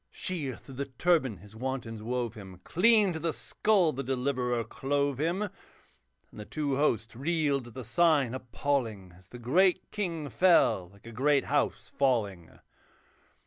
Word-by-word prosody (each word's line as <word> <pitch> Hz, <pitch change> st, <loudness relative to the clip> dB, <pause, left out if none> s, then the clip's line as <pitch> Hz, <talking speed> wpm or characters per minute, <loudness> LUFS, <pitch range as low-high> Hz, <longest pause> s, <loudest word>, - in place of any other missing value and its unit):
Sheer 150 Hz, -9 st, -3 dB
through 135 Hz, -, -13 dB
the 140 Hz, -, -2 dB
turban 135 Hz, -, +1 dB
his 105 Hz, +4 st, -15 dB
wantons 120 Hz, -2 st, -4 dB
wove 120 Hz, 0 st, -2 dB
him, 95 Hz, -5 st, -11 dB
Clean 210 Hz, 0 st, +4 dB
to 160 Hz, -, -4 dB
the 165 Hz, +1 st, 0 dB
skull 195 Hz, -7 st, +1 dB
the 135 Hz, -, -3 dB
Deliverer 125 Hz, -2 st, -1 dB
clove 140 Hz, +4 st, -1 dB
him; 170 Hz, +6 st, 0 dB
And 210 Hz, -, -3 dB, 0.9 s
the -, -, -5 dB
two 145 Hz, 0 st, -2 dB
hosts 115 Hz, -6 st, 0 dB
reeled 140 Hz, -2 st, 0 dB
at 120 Hz, -, -14 dB
the 130 Hz, -, -6 dB
sign 145 Hz, 0 st, +3 dB
appalling, 120 Hz, -7 st, -2 dB
As 90 Hz, 0 st, -20 dB
the 125 Hz, -, -10 dB
great 180 Hz, +10 st, +2 dB
king 170 Hz, -7 st, -3 dB
fell 170 Hz, -, +3 dB
like 100 Hz, +2 st, -21 dB
a 115 Hz, -, -9 dB
great 140 Hz, +4 st, +2 dB
house 145 Hz, 0 st, -1 dB
falling. 105 Hz, -11 st, +1 dB
135 Hz, 155 wpm, -29 LUFS, 115-160 Hz, 0.9 s, Clean